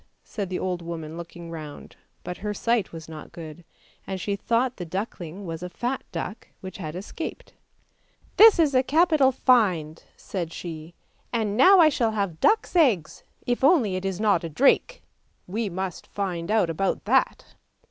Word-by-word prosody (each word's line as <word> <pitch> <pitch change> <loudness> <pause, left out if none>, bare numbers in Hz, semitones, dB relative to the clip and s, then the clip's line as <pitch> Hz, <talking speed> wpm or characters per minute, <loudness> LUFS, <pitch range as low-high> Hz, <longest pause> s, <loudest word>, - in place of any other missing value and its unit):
said 200 -4 -5
the 185 - -2
old 180 -2 -2
woman 165 -2 -6
looking 170 0 -9
round, 155 -3 -9 0.3
but 180 - -6
her 210 +1 -4
sight 230 -2 0
was 165 -1 -9
not 155 -2 -10
good, 165 0 -10 0.4
and 190 -1 -4
she 200 +2 -2
thought 235 +5 0
the 180 - -5
duckling 185 0 -5
was 165 -1 -5
a 180 - -5
fat 245 +7 -3
duck 190 +5 -6
which 190 0 -8
had 155 -3 -6
escaped.: 205 - -7 0.4
' - - -36
This 440 -1 +9
is 310 -4 +3
a 255 - +5
capital 305 -1 +3
find," 185 - +2 0.2
said 175 -4 -5
she; 165 -1 -8 0.2
' - - -39
now 235 - +5
I 320 -2 +7
shall 230 -6 0
have 200 -7 -2
duck's 440 -3 +2
eggs 240 - +2 0.2
if 245 +1 -1
only 270 - +4
it 185 - -3
is 195 -1 -3
not 205 -6 +2
a 165 - -4
drake! 280 - +2 0.4
we 210 +3 -3
must 185 0 -5
find 180 -4 -4
out 210 -6 +2
about 195 +4 -1
that! - - +1
190 Hz, 175 wpm, -25 LUFS, 170-240 Hz, 0.4 s, This